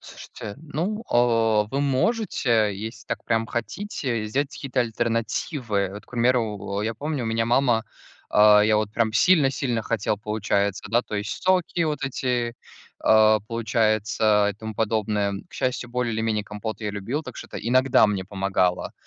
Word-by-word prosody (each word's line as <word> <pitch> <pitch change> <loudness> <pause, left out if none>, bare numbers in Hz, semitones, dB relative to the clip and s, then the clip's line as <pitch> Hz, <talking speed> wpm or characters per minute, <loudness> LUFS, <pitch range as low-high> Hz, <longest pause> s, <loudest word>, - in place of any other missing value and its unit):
Слушайте, 100 - -9
ну, 175 +8 -3
а, 115 -3 +3
вы 135 - -1
можете, 135 - +1
если 110 +2 -7
так - - -4
прям 115 -1 0
хотите, 120 - -3
сделать 135 +6 -1
какие-то 135 -2 -3
альтернативы. 115 - -1
Вот, 105 - -10
к - - -25
примеру, 115 -5 0
я 115 +1 -2
помню, 145 0 -3
у - - -3
меня 115 0 0
мама 120 -2 +2 0.5
А, 105 0 +7
я 110 0 +3
вот 105 -1 -1
прям 110 -1 +1
сильно-сильно 135 -6 +2
хотел, 105 -2 -1
получается, 100 -2 -1
да, 120 +1 +3
то - - -7
есть 105 +1 -4
соки 185 -2 +1
вот 150 -3 -2
эти, 125 -3 -1 0.5
а, 110 0 +5
получается, 110 -1 +1
и - - -8
тому 110 0 -7
подобное. 105 -2 0 0.2
К 160 - -17
счастью, 125 -3 -2
более 125 -1 -1
или 110 - -2
менее 110 -2 -1
компот 105 +2 -6
я 105 - -2
любил, 105 +9 -3
так 130 -5 -9
что - - -8
это - - -9
иногда 130 +1 +4
мне 100 -3 -2
помогало. 95 -2 0
115 Hz, 165 wpm, -24 LUFS, 105-125 Hz, 0.5 s, А